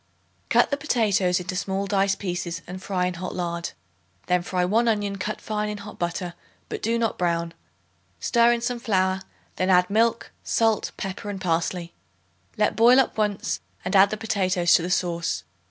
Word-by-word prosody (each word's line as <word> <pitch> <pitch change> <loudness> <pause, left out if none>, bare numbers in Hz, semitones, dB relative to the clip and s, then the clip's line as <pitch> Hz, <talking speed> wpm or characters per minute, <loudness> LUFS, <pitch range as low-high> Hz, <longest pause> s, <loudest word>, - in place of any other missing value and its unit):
Cut - - +4
the 280 - +1
potatoes 210 - +2
into 185 +1 -5
small 195 +1 -1
dice 195 -1 +2
pieces 175 -3 -4
and 185 +1 -8
fry 185 -2 -1
in 180 - -1
hot 180 +1 -5
lard. 170 -1 -3 0.6
Then 180 -1 +2
fry 180 0 0
1 225 +6 +2
onion 205 -3 0
cut 215 +3 -3
fine 210 -1 -2
in 210 - -4
hot 205 +1 -10
butter, 175 0 -2 0.4
but - - -5
do 230 +2 +1
not 230 -2 -1
brown; 170 -1 0 0.7
stir 235 0 +4
in 235 0 0
some 240 0 -2
flour; 190 -5 +1 0.4
then 185 - 0
add 180 +1 +4
milk, 230 +2 +2
salt, 225 -2 +1
pepper 195 +1 -5
and 200 -1 -4
parsley. 170 0 -1 0.6
Let 210 0 +2
boil 240 +3 +6
up 265 - +1
once 210 -2 -1 0.3
and 185 - -1
add 195 +1 +7
the 215 - -3
potatoes 185 -5 +1
to - - +6
the 175 - -3
sauce. 170 - -1
195 Hz, 180 wpm, -25 LUFS, 180-215 Hz, 0.7 s, add